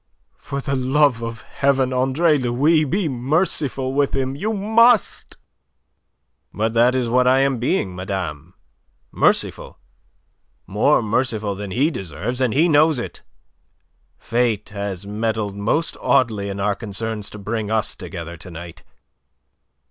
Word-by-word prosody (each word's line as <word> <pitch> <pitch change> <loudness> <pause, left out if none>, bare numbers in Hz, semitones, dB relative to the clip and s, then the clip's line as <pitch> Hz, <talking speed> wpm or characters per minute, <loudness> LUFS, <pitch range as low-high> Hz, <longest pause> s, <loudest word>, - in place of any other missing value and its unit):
"For 140 0 -5
the 140 0 -2
love 130 -1 +2
of 115 -1 -5
Heaven, 135 -2 0
Andre 135 +6 +2
Louis, 145 +5 +2
be 180 +5 0
merciful 135 -1 -1
with 140 0 +1
him! 135 0 -1
You 210 +9 -2
must!" 220 +2 +3 1.1
"But 110 +2 -1
that 120 +2 +4
is 125 -2 0
what 125 +2 +3
I 130 +1 +4
am 135 -3 +1
being, 115 - -1
madame 90 -3 -5 0.6
merciful; - - 0 0.9
more 115 +7 +2
merciful 110 -2 -1
than 100 0 -6
he 135 - +1
deserves. 95 - -4
And 125 -3 +2
he 155 +9 +3
knows 155 -1 +4
it. 120 - -6 1.0
Fate 115 -3 -1
has 100 -2 -5
meddled 105 -1 -2
most 110 +11 -1
oddly 110 -5 +1
in 100 0 -5
our 105 +1 +1
concerns 110 0 -4
to - - -10
bring 105 +1 -3
us 110 -3 0
together 85 -3 -8
to 90 - -10
night. 85 0 -10
120 Hz, 135 wpm, -21 LUFS, 100-140 Hz, 1.1 s, that